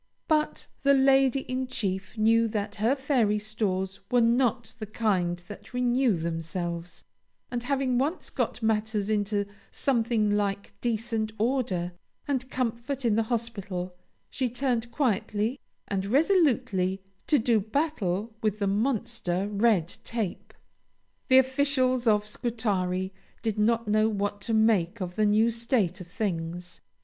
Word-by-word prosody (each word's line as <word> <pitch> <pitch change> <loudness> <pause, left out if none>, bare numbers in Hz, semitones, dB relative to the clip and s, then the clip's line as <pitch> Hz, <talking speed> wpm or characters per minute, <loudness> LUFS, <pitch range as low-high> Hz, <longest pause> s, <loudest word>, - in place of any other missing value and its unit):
But 305 -1 +1 0.2
the 280 0 +5
Lady 270 0 +4
in 255 0 -3
Chief 195 -4 -3
knew 225 +1 +4
that 210 -1 -3
her 225 +6 +2
fairy 255 -7 +2
stores 200 -3 -2
were 245 - +4
not 235 0 +2
of - - -24
the 215 - -5
kind 190 -5 0
that 205 +4 -10
renew 250 -2 +2
themselves; 170 +1 -4 0.5
and 240 -1 -2
having 260 -1 0
once 300 +7 -2
got 245 - -2
matters 220 -1 0
into 205 -1 0 0.2
something 230 -5 +1
like 200 -1 -2
decent 225 -2 -1
order 220 -7 0 0.4
and 260 -2 -1
comfort 250 +2 -2
in 230 - +3
the 225 - +3
hospital, 200 -6 -3 0.4
she 255 -2 -1
turned 245 -1 -1
quietly 225 -1 0 0.3
and 195 -1 -2
resolutely 255 - +2 0.2
to 300 - +4
do 230 -2 +3
battle 215 - -1
with 215 -1 0
the 205 - -1
monster 205 -3 0
Red 205 -5 +3 0.2
Tape. 225 -6 -4 0.8
The 260 -2 +6
officials 260 -2 +2
of 210 -1 +4
Scutari 195 -5 -1 0.3
did 220 -2 -1
not 230 +1 +2
know 215 +1 +3
what 205 -1 -2
to 225 - -2
make 220 -3 +3
of 180 -2 -4
the 215 -1 +3
new 215 +3 +4
state 230 -6 0
of 180 - -9
things. 175 -2 -3
220 Hz, 140 wpm, -27 LUFS, 200-250 Hz, 0.8 s, The